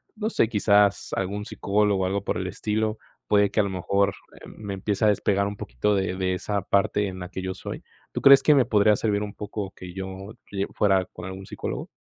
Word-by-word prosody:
no 215 0 -2
sé, 115 - +2
quizás 105 -2 +3
algún 100 +2 -3
psicólogo 100 -2 +1
o - - +1
algo 100 +1 -1
por - - -2
el 95 - -3
estilo, 110 +3 -2 0.3
puede 100 -1 +4
que 110 - 0
a - - +1
lo 100 - -2
mejor, 100 +2 +1 0.3
eh, - - -10
me 100 -2 -7
empieza 100 +2 -1
a - - +6
despegar 100 -1 +1
un 100 - -5
poquito 65 +12 -1
de 95 -1 -1
de 95 0 0
esa 100 +2 -2
parte 100 +1 +1
en 95 -1 -6
la 90 -1 -7
que 95 - -6
yo 95 0 -3
soy. 95 - -7 0.3
¿Tú - - -4
crees 140 0 +8
que 150 - +6
me 135 -3 +4
podría 105 -2 +4
servir 105 -1 0
un 105 - -6
poco 105 -1 -5
que 90 -1 -9
yo 95 +2 -7 0.2
lle 100 -1 -1
fuera 95 -2 +2
con 90 - -11
algún 95 +1 -7
psicólogo? - - -5
100 Hz, 230 wpm, -25 LUFS, 95-105 Hz, 0.3 s, crees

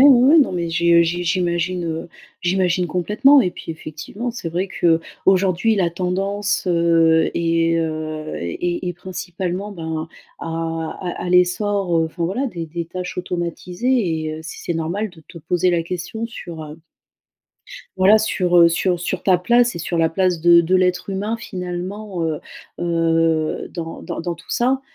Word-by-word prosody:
ouais, 275 +3 +7
non, 275 -9 +3
mais 170 -2 -2
j'ai 170 +1 +2
heu 170 - +7
j'ai 175 +1 -1
j'imagine, 175 0 0
heu 165 +1 -4 0.3
j'imagine 180 0 +1
complètement 210 - +4
et 180 - 0
puis 175 - -8
effectivement 160 +9 -6
c'est 230 -8 -5
vrai 180 +4 -2
qu'aujourd'hui 185 +4 +2
la 180 -4 +2
tendance, 195 +4 -1
heu, 165 -2 +3
est 165 0 +1
heu 155 -1 -3
est 175 - -2
est 175 - -3
principalement 185 +2 -5
ben, 160 -3 -4 0.3
à - - -6 0.6
à 175 - -4
à - - -3
l'essor 180 +2 +2
enfin 165 0 0
voilà 230 +11 -1
des 175 -9 -5
des 165 +1 -5
tâches 180 +2 -6
automatisées 180 +2 -1
et 155 0 -3
heu, - - -8
si 160 - -8
c'est - - -2
normal 170 +6 -2
de 170 -2 -16
te - - -14
poser 175 +3 0
la 170 -1 +1
question 180 +6 -5
sur 170 -8 -8
heu 150 +1 -10 1.2
voilà 195 +4 +6
sur 180 -4 0
heu 170 0 +7
sur 175 +1 0
sur 175 - -3
ta 185 -2 +4
place 240 +5 +3
et - - -5
sur 170 +1 -2
la 165 0 +4
place 180 +1 +1
de 170 +1 +6
de 175 +3 +1
l'être 180 +1 +1
humain 205 +4 -2
finalement 185 -1 -5
heu 160 -2 -1 0.4
heu, 165 -2 +1
dans 165 -2 -6
dans - - -5
dans 170 0 -3
tout 165 - -13
ça. 260 +2 +1
175 Hz, 170 wpm, -20 LUFS, 165-190 Hz, 1.2 s, ouais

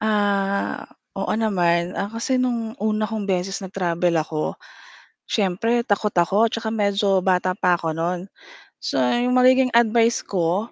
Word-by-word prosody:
Ah, 200 -2 0 0.3
oo - - -2
naman. 175 -5 0
Ah, 200 +2 -3
kasi 235 +3 -1
noong 240 -2 -1
una 215 0 -1
kong 220 -2 -4
beses 190 0 -2
nag-travel 180 -2 -1
ako, 155 0 -3 0.7
siyempre 225 +4 0
takot 210 +1 +1
ako 200 +6 +2
tsaka 230 -1 -3
medyo 200 -3 +1
bata 185 0 +1
pa 180 -3 +2
ako 160 -1 -3
noon. 175 +2 -1 0.6
So, - - -4
iyong 245 - +1
magiging 255 +1 +5
advice 235 0 +3
ko 185 +4 -1
200 Hz, 140 wpm, -22 LUFS, 180-225 Hz, 0.7 s, magiging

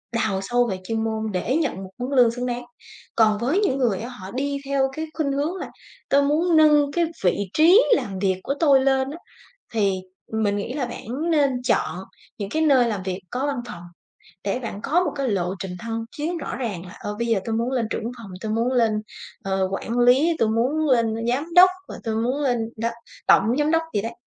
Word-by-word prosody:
đào 220 -4 0
sâu 245 +4 +1
về 185 - -3
chuyên 225 +3 -2
môn 220 -1 -2
để 205 +8 0
nhận 290 - -1
một 190 - -9
mức 245 - -3
lương 245 -3 +6
xứng 245 +1 -4
đáng. 245 0 -3 0.5
Còn 215 -2 +4
với 260 - +1
những 390 -11 +1
người 235 -8 +1
á, 235 - -6
họ 195 -7 -9
đi 280 +3 -2
theo 270 -1 +1
cái 315 +3 -4
khuynh 305 -4 -1
hướng 290 +6 -1
là 375 - -6 0.4
"Tôi 280 - +5
muốn 320 +4 +2
nâng 300 -2 +5
cái 340 +2 +1 0.2
vị 180 - +3 0.2
trí 350 +9 +6
làm 195 - -3
việc 190 -1 +1
của 275 - -1
tôi 280 -5 +5
lên 265 0 +2
á" 310 - -7 0.6
thì 200 -4 +1 0.3
mình 215 -2 +1
nghĩ 205 +4 -3
là 275 -1 -2
bản 250 +6 -4
nên 290 -4 +3 0.2
chọn 225 - +1 0.4
những 200 -2 -4
cái 315 +7 0
nơi 270 -6 +5
làm 205 -4 -3
việc 185 0 -4
có 260 +3 -1
văn 285 -1 -1
phòng 170 -5 -8 0.6
để 200 +4 0
bạn 230 -5 -6
có 345 +8 +2
một - - -2
cái 275 -2 -1
lộ 185 -3 -1
trình 190 0 -5
thăng 225 +2 -4
chiến 330 +4 -2
rõ 300 - -5
ràng 205 -8 -4
là 180 - -11
"Ờ, 205 0 -5
bây 235 - -1
giờ 225 -4 +2
tôi 225 - -2
muốn 235 +2 -1
lên 245 -4 0
trưởng - - -2
văn 235 - -3
phòng, 220 -4 -10
tôi 215 +1 -3
muốn 230 +3 +1
lên, 230 -3 +3 0.5
ờ, 190 -1 0
quản 230 +4 -3
lý, 265 +7 +4
tôi 225 - +2
muốn 260 +8 +1
lên 230 -3 +3
giám 290 +8 -1
đốc, 365 +1 +9 0.2
và - - -7
tôi 220 -1 -1
muốn 245 +6 0
lên 255 -4 +1 0.2
đó, 230 +1 -1 0.4
tổng 225 +5 +4
giám 295 +1 +2
đốc" 325 0 +3
gì 205 - +1
đấy, 230 +2 -4
245 Hz, 230 wpm, -23 LUFS, 220-285 Hz, 0.6 s, đốc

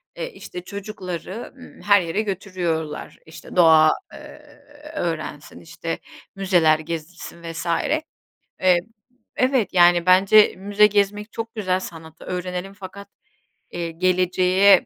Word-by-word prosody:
eee, - - -5
işte 180 - -9
çocukları, 195 +1 -7
ımm, 255 - -14
her 205 -1 +5
yere 175 +5 -1
götürüyorlar. 175 -6 -4
İşte 160 +1 -12
doğa, 160 -3 +6 0.2
eee, - - -12 0.6
öğrensin, 155 -3 -4
işte 165 0 -6 0.4
müzeler 175 -5 +3
gezilsin 165 +1 -7
vs. 165 +1 -6 1.0
Eee, 185 -1 +5 0.6
evet 255 -7 +1
yani 175 -1 +5
bence 195 +3 +6
müze 205 +2 +4
gezmek 205 +1 0
çok 225 +1 -6
güzel. 185 -4 0
Sanatı 160 -3 -10
öğrenelim 180 +1 -4
fakat, 200 +1 -10 0.6
eee, 170 -1 -4
geleceğe 185 +2 +3
185 Hz, 115 wpm, -22 LUFS, 170-200 Hz, 1.0 s, doğa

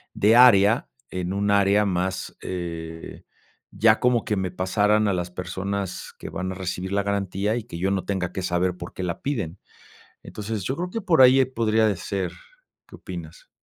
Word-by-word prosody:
de 110 +3 +4
área 115 -3 +6 0.2
en 90 -1 -3
un 100 +1 0
área 100 +1 +4
más, 95 0 -2
eh, 85 -2 -6 0.5
ya 110 0 +3
como 125 -2 +2
que 105 - 0
me 95 -2 -1
pasaran 105 +3 +2
a 100 - +2
las 90 -1 -2
personas 95 +1 -4
que - - -8
van 95 +1 -4
a - - -6
recibir 95 0 -4
la 100 0 +1
garantía 100 +1 -1
y 120 - -3
que 105 -7 -8
yo 95 +3 0
no 95 -1 0
tenga 95 -3 -2
que 95 - -3
saber 90 0 0
por 85 - -8
qué 95 - -4
la 85 -2 -3
piden. 110 - -3 0.6
Entonces 105 -2 -5
yo 130 +7 -2
creo 180 +1 -3
que 225 +3 -4
por 175 -7 +3
ahí, 130 +1 +7
eh, 130 - +4
podría, 110 -3 +2
eh, 100 - -2
ser. 95 0 -3 0.5
¿Qué - - -13
opinas? - - -9
100 Hz, 195 wpm, -24 LUFS, 90-110 Hz, 0.6 s, ahí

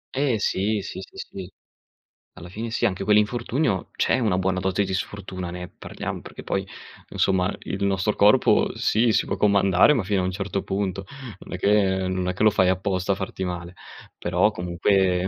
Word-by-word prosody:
Eh 135 -3 +1
sì, 105 +1 0
sì, - - -7
sì, 95 - -13
sì. 95 -1 -8 0.8
Alla 90 -1 -11
fine 110 +4 -5
sì. 120 +1 +1
Anche 95 -1 -3
quell'infortunio, 105 - +1
c'è - - +2
una 105 -7 +1
buona 95 0 0
dose 95 +2 0
di 95 - -4
sfortuna, 95 -1 -5
ne 90 0 -6
parliamo - - -6
perché - - -10
poi, 95 -1 -2 0.4
insomma, 95 0 +1
il 100 +1 -4
nostro 100 +2 0
corpo, 105 +1 +4
sì, 115 +1 +2
si - - +1
può - - -2
comandare 100 +4 +4
ma 125 - +1
fino 95 0 0
a - - -2
un 95 - -1
certo 100 +1 -3
punto, 95 -1 -3 0.4
non - - -10
è 90 - -3
che 95 -2 +2
non 95 -1 -2
è 90 - 0
che - - -7
lo 110 - +7
fai 95 -3 +3
apposta 95 +1 0
a - - +2
farti 95 0 -5
male, 90 -1 -5 0.4
però 90 +4 +2
comunque, 90 0 +1
95 Hz, 190 wpm, -24 LUFS, 90-105 Hz, 0.8 s, lo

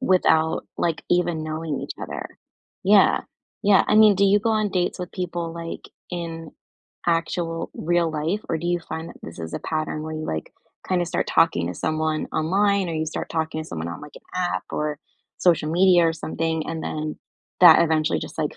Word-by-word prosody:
without, 170 -7 +2
like, 165 -2 0
even 175 -2 +1
knowing 155 -1 -3
each - - -5
other. - - -5 0.6
Yeah. - - +5 0.4
Yeah. 200 -1 +5
I - - +3
mean, 215 -1 +7
do 200 - +4
you 200 +1 +4
go 225 +2 +1
on 215 -2 +1
dates 180 0 -1
with 180 -1 -6
people, 175 -3 -3
like, 165 0 -7 0.2
in 165 -2 -5 0.6
actual 165 0 -1
real 170 0 +1
life, 160 +7 -1
or 165 - 0
do 170 - -4
you 175 0 +1
find 165 0 -6
that - - -12
this 80 - -9
is 80 -1 -6
a - - -1
pattern 155 -1 -3
where 155 0 -5
you, 155 0 -4
like, 80 -1 -4 0.4
kinda 180 -2 +2
start - - -1
talking 165 - +3
to 90 - -4
someone 155 - -1
online 195 +3 +2
or 165 - -3
you 155 0 -1
start 155 - -4
talking 160 -1 -2
to - - -11
someone 80 +1 -4
on, 85 - -6
like, 150 0 -12
an - - -13
app 180 -1 -1
or 150 -1 -2 0.4
social 165 -4 +3
media 175 0 +5
or 165 - +2
something, 160 0 -2
and 165 -1 -4
then 155 0 -4 0.4
that 180 - +9
eventually 155 -1 +1
just, - - -8
like, 150 -2 -2
165 Hz, 195 wpm, -23 LUFS, 155-175 Hz, 0.6 s, that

